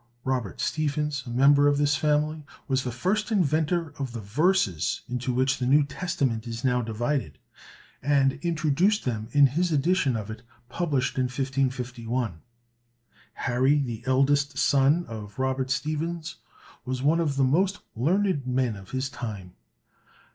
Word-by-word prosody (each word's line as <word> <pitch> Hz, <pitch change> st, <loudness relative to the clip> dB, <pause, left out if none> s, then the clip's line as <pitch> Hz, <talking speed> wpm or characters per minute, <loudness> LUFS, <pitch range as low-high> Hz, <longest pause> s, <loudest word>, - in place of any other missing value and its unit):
Robert 125 Hz, -8 st, -2 dB
Stephens, 150 Hz, -2 st, -1 dB
a -, -, -5 dB
member 140 Hz, +4 st, +5 dB
of 145 Hz, 0 st, +3 dB
this 145 Hz, 0 st, +2 dB
family, 150 Hz, +1 st, 0 dB, 0.2 s
was 135 Hz, -2 st, +1 dB
the 125 Hz, -, -3 dB
first 195 Hz, -, -1 dB
inventor 160 Hz, -3 st, +1 dB
of 135 Hz, -4 st, -4 dB
the 115 Hz, -, -5 dB
verses 105 Hz, -, +1 dB
into 125 Hz, +1 st, -2 dB
which 130 Hz, +2 st, +1 dB
the 125 Hz, -, -1 dB
New 145 Hz, +3 st, +5 dB
Testament 135 Hz, -7 st, -2 dB
is 115 Hz, 0 st, -5 dB
now 125 Hz, -2 st, +2 dB
divided, 115 Hz, -, -2 dB, 0.6 s
and 135 Hz, -1 st, +2 dB
introduced 170 Hz, +5 st, +1 dB
them 110 Hz, -4 st, -2 dB
in 145 Hz, -1 st, +6 dB
his 165 Hz, +6 st, +1 dB
edition 150 Hz, -2 st, +2 dB
of 110 Hz, -1 st, -4 dB
it 110 Hz, -, -8 dB, 0.3 s
published 145 Hz, -7 st, -1 dB
in 130 Hz, -, +2 dB
1551. 125 Hz, -, -2 dB, 1.0 s
Harry, 130 Hz, +4 st, +3 dB
the 120 Hz, -6 st, -3 dB
eldest 140 Hz, +1 st, +2 dB
son 140 Hz, +7 st, +3 dB
of 105 Hz, -3 st, -9 dB
Robert 130 Hz, 0 st, -1 dB
Stephens, 155 Hz, +5 st, -2 dB, 0.5 s
was 130 Hz, +1 st, -3 dB
one 160 Hz, +4 st, +3 dB
of 150 Hz, -4 st, 0 dB
the 140 Hz, -, +2 dB
most 185 Hz, +9 st, +2 dB
learned 165 Hz, -, +1 dB
men 125 Hz, -3 st, 0 dB
of 95 Hz, -2 st, -12 dB
his 130 Hz, 0 st, -2 dB
time. 105 Hz, -9 st, -7 dB
135 Hz, 145 wpm, -26 LUFS, 125-150 Hz, 1.0 s, in